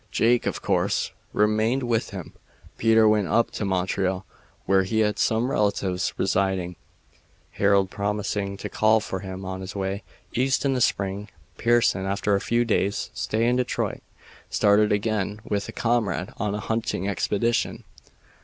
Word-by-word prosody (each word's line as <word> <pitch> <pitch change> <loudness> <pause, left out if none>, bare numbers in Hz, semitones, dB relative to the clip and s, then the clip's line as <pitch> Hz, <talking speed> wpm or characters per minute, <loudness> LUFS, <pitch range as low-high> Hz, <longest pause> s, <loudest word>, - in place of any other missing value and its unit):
Jake, 120 +1 +2
of - - -3
course, - - +1 0.2
remained 110 +5 +2
with 115 -1 0
him. 95 -5 -8 0.5
Peter 110 -1 +5
went 105 -3 +3
up 115 +8 +2
to 105 - -3
Montreal, 95 0 -1 0.4
where 95 0 +4
he 110 +4 0
had 105 -1 +1
some 115 +4 +1
relatives 95 -4 0
residing; 95 -2 0 0.8
Harold 100 -2 +2
promising 100 -1 -2
to - - -5
call 110 +1 +3
for 95 -3 -4
him 95 0 -7
on 95 0 -5
his 95 +1 -7
way 100 +1 -2 0.3
East 130 +3 +1
in 135 - +2
the 125 - -1
spring. 100 -1 0 0.3
Pearson, 115 -5 +2
after 100 +1 0
a 100 - +2
few 120 0 +1
days' 100 -2 0
stay 110 +2 -1
in 125 +1 +2
Detroit, 125 - -1 0.5
started 105 +1 +3
again 105 0 0
with 100 -2 -2
a - - -4
comrade 110 -7 0
on 105 -1 -1
a - - -3
hunting 110 -4 -2
expedition. 105 +4 0
105 Hz, 155 wpm, -25 LUFS, 95-115 Hz, 0.8 s, Peter